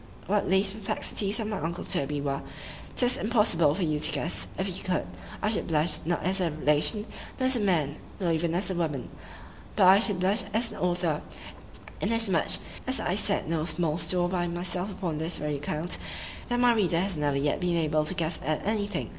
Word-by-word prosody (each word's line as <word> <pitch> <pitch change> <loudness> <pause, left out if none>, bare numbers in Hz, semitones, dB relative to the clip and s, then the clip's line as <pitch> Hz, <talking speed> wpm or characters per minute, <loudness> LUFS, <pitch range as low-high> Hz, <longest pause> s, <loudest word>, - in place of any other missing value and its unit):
What 205 0 0
these 195 +1 +3
perplexities 205 0 -1
of 220 - -2
my 210 -2 -3
uncle 170 +2 -3
Toby 145 +1 0
were,——'tis 145 - -1
impossible 210 -9 +3
for 190 - -1
you 155 -2 0
to - - +5
guess;—if 185 +3 -2
you 190 0 -5
could,—I 90 - -3
should 215 - -1
blush; 160 +1 +1
not 175 +1 -1
as 190 +1 +1
a 175 - +1
relation,—not 155 - -1
as 260 0 +5
a - - +1
man,—nor 170 -1 -1
even 165 +1 0
as 190 +2 +2
a - - -2
woman,—but 160 +4 -4
I 190 +2 +8
should 205 -4 0
blush 195 +5 +2
as 230 +1 +1
an - - -9
author; 175 -3 0 0.8
inasmuch 210 -5 +2 0.3
as 260 - +1
I 175 - -1
set 200 -3 +1
no 160 -1 0
small 165 -1 0
store 175 +2 +2
by 175 -1 -1
myself 180 +3 -2
upon 170 -5 -3
this 160 +2 -1
very 150 -1 -2
account, 150 +4 0 0.5
that 245 0 +1
my 245 -1 +5
reader 180 -7 +2
has 190 0 -1
never 145 -2 0
yet 145 +1 0
been 175 -1 0
able 155 -1 +1
to 185 - -1
guess 165 -1 -1
at 155 +2 -1
any 210 -1 0
thing. 205 -4 -4
175 Hz, 190 wpm, -27 LUFS, 155-200 Hz, 0.8 s, I